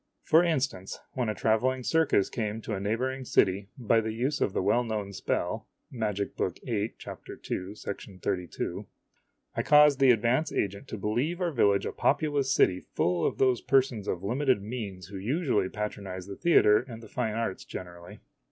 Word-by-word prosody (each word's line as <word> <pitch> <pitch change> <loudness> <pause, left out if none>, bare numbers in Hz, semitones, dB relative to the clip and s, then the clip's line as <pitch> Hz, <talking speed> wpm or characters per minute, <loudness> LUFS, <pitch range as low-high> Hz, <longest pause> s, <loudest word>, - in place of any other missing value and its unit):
For 160 +2 +5
instance, 140 - -1 0.2
when 125 -4 -1
a 105 - -2
traveling 125 +5 +1
circus 160 -10 +2
came 110 -2 -2
to 110 - -4
a 95 - -2
neighboring 125 +6 -1
city, 100 -4 +2
by 115 -2 +2
the 110 0 -3
use 130 +6 -1
of - - +2
the - - -1
well 120 +5 +3
known 105 -4 -3
spell - - -2 0.2
(Magic 105 -5 -2
Book 90 - -2
VIII, 110 -3 -2
chap, - - -9
ii, 95 +3 -5 0.4
32) 90 -2 -3 0.7
I - - +1
caused 150 -1 +6
the 135 -1 +6
advance 125 +6 +3
agent 100 0 -2
to - - -5
believe 120 - -1
our 175 -2 0
village 100 -7 +3
a - - -2
populous 145 -3 +1
city 90 -8 +3
full 85 -1 -1
of - - -3
those 130 -3 +3
persons 130 -6 +1
of 90 0 -2
limited 130 +3 +1
means 100 -6 -6
who 100 - -7
usually 115 - 0
patronize 100 -3 -5
the 100 - -7
theater 105 - +5
and 120 -2 -9
the - - -10
fine 110 -4 -2
arts 115 -4 -2
generally. 85 -1 -9
110 Hz, 175 wpm, -28 LUFS, 100-130 Hz, 0.7 s, caused